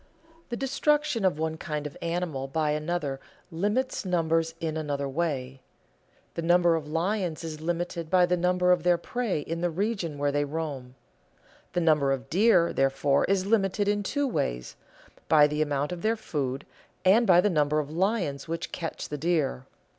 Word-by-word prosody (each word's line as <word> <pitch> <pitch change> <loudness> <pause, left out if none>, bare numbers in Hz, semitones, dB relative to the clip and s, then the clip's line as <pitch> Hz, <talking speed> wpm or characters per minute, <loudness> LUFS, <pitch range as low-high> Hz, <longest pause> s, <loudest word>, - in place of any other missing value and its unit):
The 240 - -3
destruction 295 -2 +1
of 185 -6 +2
one 160 0 -2
kind 150 -2 -4
of 145 - -6
animal 170 -5 -2
by 150 +2 0
another 150 -2 -2 0.3
limits 210 +10 -1
numbers 165 -3 0
in 160 -1 -3
another 145 -3 -2
way. 135 -3 -3 0.7
The - - -3
number 175 0 +4
of 155 -2 -4
lions 170 +1 -1
is 155 -1 -6
limited 170 0 -3
by 180 0 +5
the 180 0 +1
number 180 +1 +2
of 180 -1 +3
their 175 +1 +3
prey 230 -6 -2
in 165 +3 -4
the 175 - +1
region 185 -3 -2
where 145 0 +1
they 145 0 +1
roam. 145 -4 -5 0.8
The 175 - +1
number 150 -4 +3
of 135 0 -3
deer, 185 -2 +4
therefore, 135 +1 +2
is 190 -1 +1
limited 200 -1 +1
in 205 0 +1
two 285 +8 -1
ways, 60 - -2 0.5
by 150 -2 +7
the 150 +1 -1
amount 145 +1 0
of 175 -1 -5
their 225 +1 +1
food 140 -9 -3 0.4
and 220 +5 +5
by 175 -2 +7
the 205 +3 +3
number 150 -2 +2
of 150 -1 -2
lions 175 -5 -1
which 165 +1 -4
catch 165 -2 -5
the 150 - -5
deer. 150 -6 0
165 Hz, 175 wpm, -27 LUFS, 150-185 Hz, 0.8 s, by